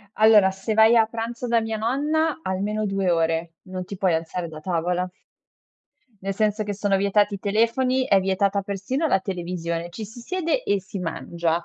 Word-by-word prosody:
Allora, 215 -3 +6
se 195 +3 -3
vai 220 +2 +6
a 225 - +5
pranzo 230 +2 -5
da 235 -1 +3
mia 225 0 -3
nonna, 295 +8 0
almeno 210 +2 -2
2 195 -2 0
ore. 165 0 0
Non 185 -1 -6
ti 195 +2 -7
puoi 180 -3 +2
alzare 165 +2 -3
da 155 -1 -9
tavola. 180 +1 -1 1.1
Nel 195 0 -3
senso 215 +1 0
che 205 0 -3
sono 200 0 +1
vietati 200 +1 +2
i - - -5
telefoni, 235 +6 +1
è 195 -7 +4
vietata 195 +1 +1
persino 200 - -2
la 245 - +2
televisione, 170 -3 -4
ci 215 +5 -6
si 220 +4 -11
siede 365 - -1
e 200 -1 +1
si 195 +2 -7
mangia. 170 -1 -2
200 Hz, 180 wpm, -24 LUFS, 180-225 Hz, 1.1 s, Allora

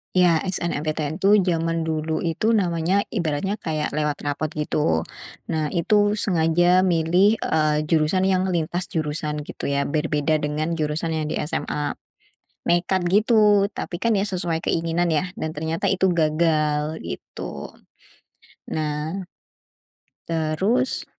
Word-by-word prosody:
Ya 180 -3 +5
SNMPTN 155 -3 -2
itu 200 +1 +5
jaman 165 -2 0
dulu 160 0 -2
itu 195 +7 +1
namanya 180 -1 +1
ibaratnya 180 +2 -1
kayak 155 -5 -2
lewat 150 0 -2
rapor 145 +2 -2
gitu. 150 - 0 0.5
Nah 155 -1 0
itu 205 +4 +3
sengaja 175 -1 +3
milih, 180 +5 +3
eee, 155 -1 +1
jurusan 155 +3 +1
yang 190 -1 +2
lintas 175 +2 0
jurusan 150 -1 -3
gitu - - -6
ya, 140 0 +1
berbeda 150 +1 0
dengan 150 +2 -2
jurusan 155 +2 -1
yang 155 - -2
di - - -3
SMA. 150 -1 -3 0.6
Nekat 175 +2 +1
gitu, 210 -1 +4
tapi 175 - -5
kan 230 +3 +1
ya 195 - +2
sesuai 175 -5 -2
keinginan 170 +1 0
ya 180 +4 -1
dan 155 - -4
ternyata 160 +2 -2
itu 190 0 +2
gagal 155 -1 +1
gitu. 70 - -7 0.9
Nah 155 +4 -3 1.0
terus 170 +11 0
165 Hz, 125 wpm, -23 LUFS, 155-185 Hz, 1.0 s, Ya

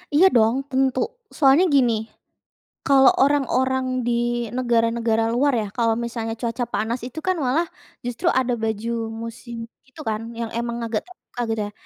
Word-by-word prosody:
Iya 350 - +7
dong 225 +1 +4
tentu, 260 -1 +1 0.4
soalnya 285 +5 +5
gini. 245 -4 +4 0.9
Kalo 270 -1 +6 0.2
orang-orang 260 -2 +1 0.2
di 240 - +1 0.5
negara-negara 230 -2 +1
luar 275 +3 +2
ya, 210 - -4
kalo 230 -1 +3
misalnya 230 -1 -4
cuaca 235 +1 -1
panas 230 +3 -1
itu 275 +5 -7
kan 370 - +3
malah 310 +7 +2 0.4
justru 245 -1 -2
ada 250 -1 0
baju 220 +1 -2 0.3
musim 230 0 -7 0.2
itu 260 - -18
kan, 215 0 -2 0.2
yang 230 -1 -3
emang 235 0 -2
agak 225 -1 -1
terbuka 365 -8 -14
gitu 225 -1 -1
ya. - - -16
240 Hz, 150 wpm, -23 LUFS, 230-265 Hz, 0.9 s, Iya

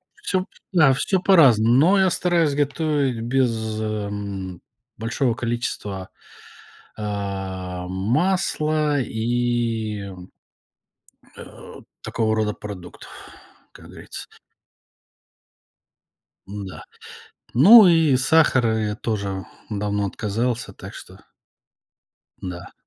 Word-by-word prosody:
всё, 185 0 -2 0.3
да, 150 -6 +5
всё 185 +7 0
по-разному. 125 - +5
Но 180 +9 +5
я 190 - +4
стараюсь 170 -5 +1
готовить 145 -4 0
без, 125 +2 +1 0.3
эм, 100 -4 -4 0.4
большого 115 +3 -1
количества, 110 -5 -4 0.9
а, 95 -3 -4
масла 150 - 0
и, 115 -2 -1
м, 95 -2 -10 1.1
э, - - -12 0.3
такого 110 -1 -1
рода 105 -1 0
продуктов, 95 -4 -10 0.6
как - - -15
говорится. - - -10 2.2
М-да, 100 -2 -8 0.7
ну 205 - +9
и 160 -6 +4
сахара 130 -5 +3
я 105 -1 -1
тоже 100 -4 -3 0.3
давно 105 -1 -1
отказался. 115 +5 -2
Так - - -11
что - - -12 1.2
да. 90 -1 -8
115 Hz, 85 wpm, -22 LUFS, 100-145 Hz, 2.2 s, ну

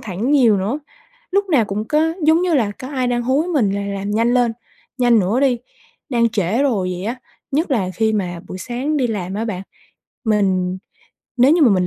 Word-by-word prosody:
thẳng 210 +5 -3
nhiều 250 -8 +5
nữa. 215 +10 -1 0.5
Lúc 400 +1 +1
nào 260 -9 +4
cũng 205 +1 -3
có 315 +2 +2
giống 320 +3 +4
như 360 -2 +1
là 230 -8 +2
có 255 - -7
ai 260 -3 -1
đang 240 -1 0
hối 265 +7 +1
mình 275 - +2
là 200 +1 -2
làm 200 0 -3
nhanh 230 +3 +2
lên, 245 -2 +3 0.5
nhanh 240 -2 +4
nữa 205 +6 +1
đi, 260 -3 +2 0.5
đang 235 -4 +2
trễ 215 +3 0
rồi 215 -10 +1
vậy 180 - -6
á, 235 +4 -2 0.3
nhất 305 +4 0
là 200 -9 +1
khi 220 -1 +1
mà 180 -5 -2
buổi 185 - -6
sáng 250 - -2
đi 265 -4 +2
làm 195 -5 -3
á 215 +2 -2
bạn. 195 -5 -4 0.6
Mình 190 -4 +1 0.6
nếu 255 +4 +5
như 335 0 +4
mà 270 - +7
mình 185 -2 +2
230 Hz, 210 wpm, -19 LUFS, 200-270 Hz, 0.6 s, mà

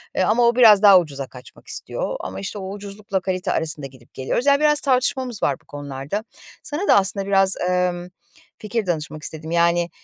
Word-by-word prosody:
Eee, - - +2
ama 225 +5 +2
o 235 - +2
biraz 220 -5 +7
daha 200 -3 +8
ucuza 140 -5 -5
kaçmak 125 -1 -15
istiyor - - -4
ama 95 +1 -6
işte 100 - -6
o 190 0 -6
ucuzlukla 200 -1 -4
kalite 185 -1 -2
arasında 155 -3 -2
gidip 125 -2 -20
geliyoruz. 135 - -2
Yani 280 0 +4
biraz 300 -1 +3
tartışmamız 255 -3 0
var 140 - +2
bu - - -32
konularda. 145 +7 -6 0.4
Sana 320 +8 -4
da - - +6
aslında 195 0 +1
biraz, 195 -1 +3
ımm, 180 -1 -1 0.5
fikir 215 0 -3
danışmak 155 -3 -4
istedim. 160 +1 -7
Yani, 170 0 +2
185 Hz, 185 wpm, -21 LUFS, 155-215 Hz, 0.5 s, daha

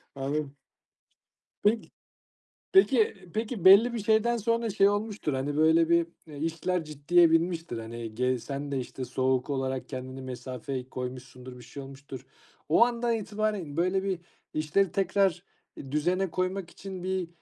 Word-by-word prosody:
Anladım. 140 +1 -3 1.1
Peki. 220 +2 +1 0.8
Peki 270 - +5 0.2
peki 220 -2 -3
belli 205 +6 +8
bir 235 - -2
şeyden 220 +3 +2
sonra 230 +1 0
şey 200 -1 +4
olmuştur, 205 -6 -2
hani, 140 +2 -2
böyle, 160 +1 +4
bir, 170 0 +4 0.2
eee, 150 -2 -10
işler 165 +3 -1
ciddiye 160 +3 +3
binmiştir. 165 -5 0
Hani, 115 0 -7
gey 125 +1 +1
sen 140 +3 -5
de, 135 - 0
işte, 130 +1 -6
soğuk 130 +1 0
olarak 130 -1 -2
kendini 130 0 -6
mesafeyi 130 0 -6
koymuşsundur, 125 0 -7
bir 125 - -12
şey 140 - -9
olmuştur. 135 -1 -10 0.4
O 195 +9 +6
andan 240 -1 0
itibaren 210 -7 -2
böyle 185 +3 +1
bir 190 -3 -1 0.3
işleri 155 +6 +1
tekrar, 195 -2 +1 0.3
eee, 135 - -9
düzene 175 +5 0
koymak 185 0 -2
için 190 0 -8
bir, 185 -1 -1
165 Hz, 145 wpm, -28 LUFS, 135-195 Hz, 1.1 s, belli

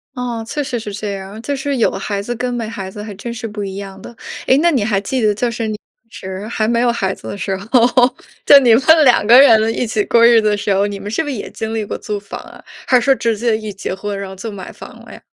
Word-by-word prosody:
哦， 240 -2 -4
确 295 +5 -3
实 250 -3 -3
是 210 -2 -7
这 205 0 -4
样， 195 +2 -8
就 280 +4 -3
是 280 +1 -2
有 235 - +2
孩 200 -1 -3
子 240 +4 -4
跟 250 +1 -2
没 235 -2 -3
孩 195 -4 -6
子 210 +2 -8
还 210 -1 -7
真 235 +4 -6
是 235 0 -7
不 210 -1 -6
一 190 -1 -6
样 195 -1 -8
的。 235 - -11 0.3
诶， 260 - +5
那 340 +2 +3
你 265 -7 +1
还 205 -2 +1
记 260 +6 -2
得 210 -2 +2
就 240 +3 -1
是 230 -1 -3
你 215 - -3
当 225 +2 -20
时 190 0 -7
还 220 -1 -1
没 235 +1 +1
有 245 0 +2
孩 195 -5 -1
子 - - -12
的 - - -5
时 195 0 -2
候， 200 +3 -12 0.8
就 285 - +9
你 245 -4 +4
们 230 - +4 0.2
2 245 -6 +4
个 240 +2 +8
人 225 -4 +5
一 - - 0
起 215 -2 -1
过 230 0 +4
日 235 -1 +6
子 215 - 0
的 210 - +1
时 205 0 -1
候， 200 +1 +2
你 200 -1 -6
们 205 - -6
是 225 - 0
不 320 - -5
是 280 - -3
也 205 - -6
经 220 0 -5
历 220 - -1
过 205 - -5
租 210 -1 -4
房 200 0 -8
啊， - - -14 0.2
还 255 - +5
是 240 - 0
说 275 - +4
直 230 -3 -1
接 230 0 +1
一 215 -2 -7
结 195 -1 -5
婚， 200 +1 -5
然 195 -1 -6
后 190 - -9
就 225 - -6
买 195 -3 -8
房 - - -11 0.2
了 - - -12
呀？ - - -13
220 Hz, 315 characters per minute, -17 LUFS, 200-240 Hz, 0.8 s, 就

